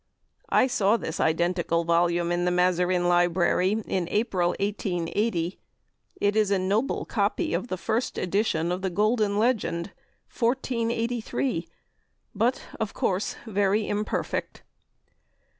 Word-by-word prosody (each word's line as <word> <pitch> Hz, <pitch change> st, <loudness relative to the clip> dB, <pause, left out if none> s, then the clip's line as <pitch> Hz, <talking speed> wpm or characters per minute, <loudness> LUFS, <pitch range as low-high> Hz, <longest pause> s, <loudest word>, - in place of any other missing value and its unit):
I -, -, +4 dB
saw 220 Hz, -4 st, +2 dB
this 165 Hz, -6 st, -5 dB
identical 170 Hz, +1 st, +1 dB
volume 170 Hz, +1 st, +2 dB
in 175 Hz, 0 st, 0 dB
the 180 Hz, -, +2 dB
Mazarin 180 Hz, 0 st, +2 dB
Library 175 Hz, +4 st, +2 dB
in 180 Hz, -3 st, -1 dB
April, 190 Hz, -5 st, +1 dB
1880. 190 Hz, -2 st, -1 dB, 0.6 s
It 205 Hz, +1 st, +1 dB
is 215 Hz, -2 st, +3 dB
a 200 Hz, -, +3 dB
noble 200 Hz, +8 st, 0 dB
copy 340 Hz, -3 st, 0 dB
of -, -, -1 dB
the 185 Hz, -, -3 dB
First 225 Hz, +6 st, -2 dB
Edition 180 Hz, -3 st, 0 dB
of 180 Hz, +1 st, -2 dB
the 190 Hz, -, -1 dB
"Golden 210 Hz, +2 st, +1 dB
Legend," 210 Hz, -6 st, 0 dB, 0.4 s
1483, 235 Hz, -5 st, -1 dB, 0.7 s
but 240 Hz, +4 st, 0 dB, 0.2 s
of 220 Hz, -2 st, -3 dB
course 190 Hz, +2 st, -1 dB
very 205 Hz, 0 st, +1 dB
imperfect. 210 Hz, +1 st, -3 dB
195 Hz, 120 wpm, -26 LUFS, 175-220 Hz, 0.7 s, I